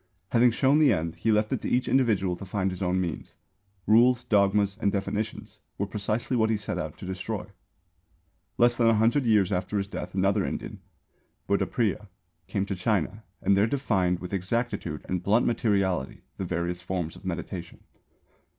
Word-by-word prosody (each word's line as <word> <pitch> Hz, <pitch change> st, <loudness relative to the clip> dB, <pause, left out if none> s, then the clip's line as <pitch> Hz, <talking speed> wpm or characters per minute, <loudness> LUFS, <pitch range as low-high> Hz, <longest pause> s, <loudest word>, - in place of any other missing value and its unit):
Having 120 Hz, +1 st, +5 dB
shown 135 Hz, +5 st, +3 dB
the 150 Hz, -3 st, +5 dB
end, 80 Hz, +1 st, -1 dB
he 110 Hz, +6 st, +1 dB
left 105 Hz, 0 st, +2 dB
it -, -, -2 dB
to -, -, -3 dB
each 125 Hz, +1 st, +1 dB
individual 105 Hz, -9 st, +2 dB
to -, -, -9 dB
find 95 Hz, 0 st, -1 dB
his 90 Hz, -, -7 dB
own 95 Hz, 0 st, +1 dB
means. 85 Hz, -4 st, -4 dB, 0.5 s
Rules, 120 Hz, +3 st, +5 dB
dogmas 100 Hz, -1 st, +2 dB
and 100 Hz, -, +2 dB
definitions 105 Hz, +2 st, -4 dB, 0.2 s
were 100 Hz, -, -1 dB
precisely 105 Hz, +5 st, -2 dB
what 110 Hz, -2 st, +2 dB
he 110 Hz, -, +2 dB
set 105 Hz, -, -4 dB
out -, -, -5 dB
to -, -, -9 dB
destroy. 95 Hz, +2 st, -4 dB, 1.1 s
Less 120 Hz, 0 st, +4 dB
than 115 Hz, -1 st, +3 dB
a 115 Hz, -, +5 dB
hundred 115 Hz, +6 st, +2 dB
years 105 Hz, -4 st, +3 dB
after 95 Hz, +2 st, -1 dB
his 100 Hz, -, 0 dB
death 100 Hz, -, -7 dB
another 100 Hz, +1 st, +2 dB
Indian, -, -, -5 dB, 0.7 s
Buddhapriya, 105 Hz, +1 st, 0 dB, 0.4 s
came 100 Hz, -1 st, -1 dB
to 100 Hz, -, -3 dB
China 105 Hz, +2 st, -1 dB, 0.2 s
and 100 Hz, -, +4 dB
there 100 Hz, +3 st, +3 dB
defined 95 Hz, -9 st, +1 dB
with 90 Hz, +2 st, -7 dB
exactitude 100 Hz, +6 st, -2 dB
and 90 Hz, -1 st, -1 dB
blunt 105 Hz, +6 st, +3 dB
materiality 100 Hz, -, 0 dB
the 95 Hz, -, -3 dB
various 90 Hz, 0 st, -2 dB
forms 90 Hz, -3 st, -3 dB
of -, -, -14 dB
meditation. 90 Hz, -1 st, -5 dB
100 Hz, 175 wpm, -27 LUFS, 95-115 Hz, 1.1 s, Having